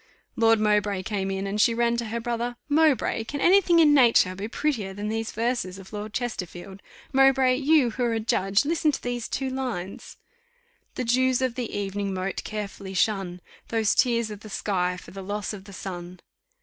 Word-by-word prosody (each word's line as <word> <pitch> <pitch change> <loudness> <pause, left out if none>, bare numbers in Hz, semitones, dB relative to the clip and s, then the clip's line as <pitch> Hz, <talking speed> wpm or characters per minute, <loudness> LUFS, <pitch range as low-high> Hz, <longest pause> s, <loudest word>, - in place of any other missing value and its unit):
Lord 225 -1 +4
Mowbray 210 -2 +1
came 195 -1 -2
in, 195 0 -2
and 205 +2 0
she 230 - +4
ran 235 0 +2
to 235 - -2
her 230 +2 -3
brother: 240 +1 -3
"Mowbray! 295 -6 +2
can 285 +5 -5
any 385 +7 +6
thing 345 -2 +3
in 310 -3 +6
nature 235 -9 +5
be 195 +3 -5
prettier 225 -7 -2
than 205 +1 -4
these 225 0 -2
verses 230 -5 -2
of 195 +2 -13
Lord 210 0 -5
Chesterfield? 195 -5 -5 0.3
Mowbray, 265 -1 +4
you, 285 -3 +3
who 250 +3 -3
are 235 - 0
a 225 - 0
judge, 200 0 +1
listen 315 0 +2
to - - -5
these 245 -1 -3
two 265 -1 -3
lines: 240 -8 -5 0.8
'The - - -2
dews 255 +2 +2
of 255 -2 0
the 240 -2 -4
evening 200 -1 -3
moat 185 +1 -3
carefully 200 -2 -6
shun, 190 -3 0 0.3
Those 225 -2 +1
tears 235 -3 +2
of 210 - -7
the 215 - -11
sky 180 -2 -1
for - - -12
the 195 - -8
loss 205 +2 -4
of 195 -2 -9
the 200 - -12
sun. 180 -1 -7
220 Hz, 195 wpm, -25 LUFS, 195-250 Hz, 0.8 s, any